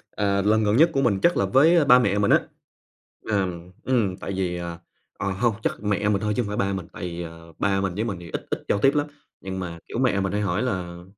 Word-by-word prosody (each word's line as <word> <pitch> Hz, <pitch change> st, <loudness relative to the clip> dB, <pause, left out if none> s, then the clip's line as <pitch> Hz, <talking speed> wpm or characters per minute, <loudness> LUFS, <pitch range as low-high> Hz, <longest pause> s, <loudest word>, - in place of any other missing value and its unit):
ờ, 100 Hz, -1 st, +1 dB
lần 110 Hz, +2 st, +3 dB
gần 105 Hz, +2 st, +2 dB
nhất 165 Hz, +4 st, +6 dB
của 135 Hz, -, +1 dB
mình 105 Hz, -7 st, +2 dB
chắc 175 Hz, -, +4 dB
là 100 Hz, -, +2 dB
với 150 Hz, -, +5 dB
ba 125 Hz, -2 st, +7 dB
mẹ 105 Hz, -5 st, +1 dB
mình 100 Hz, -, +2 dB
á. -, -, +5 dB, 0.8 s
Là, 100 Hz, -3 st, 0 dB, 0.4 s
ừm, 115 Hz, -8 st, +1 dB
tại 95 Hz, -, -6 dB
vì 90 Hz, -2 st, -1 dB
à, 85 Hz, -1 st, -6 dB, 0.4 s
ờ, 100 Hz, -, -1 dB
hông 115 Hz, +4 st, +1 dB
chắc -, -, -2 dB
mẹ 105 Hz, 0 st, 0 dB
mình 100 Hz, -1 st, +1 dB
thôi 105 Hz, 0 st, 0 dB
chứ -, -, +2 dB
hông 105 Hz, -, -5 dB
phải 105 Hz, -, -3 dB
ba 100 Hz, -1 st, 0 dB
mình, 95 Hz, -3 st, -4 dB
tại -, -, -9 dB
vì, 85 Hz, -1 st, -4 dB
ờ, 85 Hz, 0 st, -11 dB
ba 100 Hz, -1 st, +1 dB
mình 95 Hz, -2 st, -2 dB
với 105 Hz, +4 st, -1 dB
mình 100 Hz, -6 st, -3 dB
thì 85 Hz, -, -10 dB
ít -, -, -5 dB
ít -, -, -2 dB
giao 100 Hz, -, +2 dB
tiếp 135 Hz, +6 st, +3 dB
lắm. 145 Hz, 0 st, +1 dB, 0.3 s
Nhưng 95 Hz, -1 st, -5 dB
mà 85 Hz, -2 st, -5 dB
kiểu -, -, -5 dB
mẹ 125 Hz, -6 st, +2 dB
mình 95 Hz, 0 st, -1 dB
hay 105 Hz, +1 st, 0 dB
hỏi 95 Hz, 0 st, 0 dB
là: 90 Hz, -7 st, -4 dB
100 Hz, 270 wpm, -24 LUFS, 95-110 Hz, 0.8 s, ba